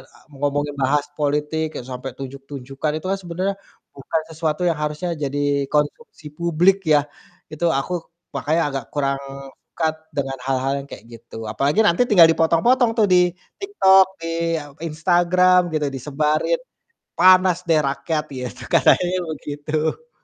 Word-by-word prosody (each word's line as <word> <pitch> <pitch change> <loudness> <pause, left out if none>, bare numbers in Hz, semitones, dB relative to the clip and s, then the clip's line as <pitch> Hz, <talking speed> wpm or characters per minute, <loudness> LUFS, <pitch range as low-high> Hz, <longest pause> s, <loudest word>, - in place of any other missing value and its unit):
a - - -19 0.2
ngomongin 145 0 -1
bahas 145 +2 +2 0.2
politik 150 +2 0
e - - -5
sampai 130 +1 -6
tunjuk-tunjukan, 135 +1 -6
itu 155 - -6
kan 195 - 0
sebenarnya 185 +3 -2 0.4
bukan 160 +4 -2
sesuatu 160 +1 -2
yang 160 -3 -2
harusnya 150 +4 -3
jadi 140 0 0
konsumsi 150 +4 -2
publik 170 +3 +3 0.2
ya. 150 - +6 0.5
Itu 155 +3 -3
aku 160 +6 -4 0.4
makanya 155 +5 0
agak 135 -3 -4
kurang 140 -1 0 0.5
suka 160 -1 +1 0.3
dengan 135 -1 -2
hal-hal 135 0 0
yang 140 - -15
kayak - - -10
gitu. 115 0 -12
Apalagi 140 - 0
nanti 175 +2 +3
tinggal 180 -8 +7
dipotong-potong 170 +10 +3
tuh 220 - +5
di 180 -1 +4 0.3
TikTok, 195 - +5 0.2
di 165 - -4 0.3
a 145 - -10 0.2
Instagram 175 +3 +3
gitu, 150 -1 0
disebarin. 150 - 0 0.6
Panas 185 0 +6
deh 160 -2 +4
rakyat, 150 +3 -2
ya 125 - -4
tuh - - -10
katanya 180 +1 +4 0.2
begitu. 155 - -4
155 Hz, 140 wpm, -21 LUFS, 140-175 Hz, 0.6 s, tinggal